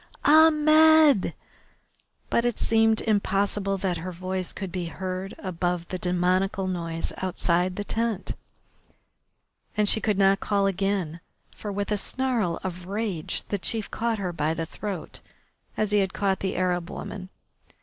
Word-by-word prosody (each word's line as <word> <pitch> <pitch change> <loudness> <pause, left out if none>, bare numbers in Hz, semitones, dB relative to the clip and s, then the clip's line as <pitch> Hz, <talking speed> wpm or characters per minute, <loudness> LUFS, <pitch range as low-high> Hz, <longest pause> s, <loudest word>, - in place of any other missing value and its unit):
Ahmed!" 310 -4 +6 1.0
But 235 - +3
it 240 -2 0
seemed 225 -1 +3
impossible 200 -1 0
that 185 -2 -1
her 180 +3 -5
voice 185 +1 -3
could 195 -3 -6
be 180 -1 -3
heard 185 +2 -5
above 175 -2 -2
the 185 - -4
demoniacal 185 +2 +1
noise 165 -2 -3
outside 180 0 0
the 205 - -3
tent, 225 -2 -2 1.5
and 210 -1 +3
she 220 - +3
could 210 -3 +1
not 195 0 +4
call 200 -1 +1
again, 195 -4 -1 0.4
for, 210 - -5
with 200 +1 -3
a 210 - +2
snarl 230 -6 -1
of 180 -1 -5
rage, 200 -5 -2
the 205 - -1
chief 220 +2 -2
caught 230 0 -1
her 185 -3 -3
by 155 0 0
the 165 - -2
throat 195 +1 -6 0.6
as 215 -1 0
he 210 - +4
had 190 -1 0
caught 195 -2 +1
the 190 - -2
Arab 180 -1 0
woman. 185 -2 -7
195 Hz, 150 wpm, -26 LUFS, 180-210 Hz, 1.5 s, Ahmed